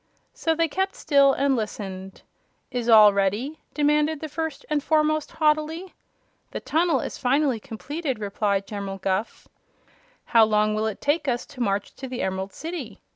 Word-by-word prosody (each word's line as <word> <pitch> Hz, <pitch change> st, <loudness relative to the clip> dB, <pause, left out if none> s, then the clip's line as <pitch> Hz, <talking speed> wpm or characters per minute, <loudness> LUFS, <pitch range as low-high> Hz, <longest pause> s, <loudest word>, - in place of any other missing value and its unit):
So 325 Hz, -1 st, 0 dB
they 330 Hz, +1 st, +2 dB
kept 380 Hz, +5 st, -2 dB
still 280 Hz, -3 st, +4 dB
and 275 Hz, 0 st, +2 dB
listened. 195 Hz, -4 st, -5 dB, 0.5 s
"Is 245 Hz, -2 st, -2 dB
all 215 Hz, -2 st, +8 dB
ready?" 205 Hz, +10 st, -1 dB, 0.2 s
demanded 300 Hz, +1 st, +2 dB
the 315 Hz, -, -5 dB
First 320 Hz, -1 st, -4 dB
and 300 Hz, -1 st, 0 dB
Foremost, 310 Hz, 0 st, +1 dB
haughtily. 310 Hz, +4 st, 0 dB, 0.6 s
"The -, -, -5 dB
tunnel 335 Hz, +1 st, +1 dB
is -, -, -6 dB
finally 270 Hz, -1 st, +2 dB
completed," 275 Hz, +4 st, -4 dB
replied 200 Hz, -1 st, -1 dB
General 200 Hz, -1 st, -5 dB
Guph. 195 Hz, +3 st, -3 dB, 0.8 s
"How 230 Hz, -1 st, +5 dB
long 215 Hz, 0 st, +2 dB
will 215 Hz, +1 st, 0 dB
it 215 Hz, -, -5 dB
take 290 Hz, +2 st, 0 dB
us 245 Hz, -2 st, -1 dB
to 280 Hz, -4 st, -10 dB
march 200 Hz, -3 st, -1 dB
to 265 Hz, -, -6 dB
the 255 Hz, -1 st, -4 dB
Emerald 190 Hz, +1 st, -3 dB
City?" 310 Hz, -, -7 dB
260 Hz, 160 wpm, -24 LUFS, 210-305 Hz, 0.8 s, all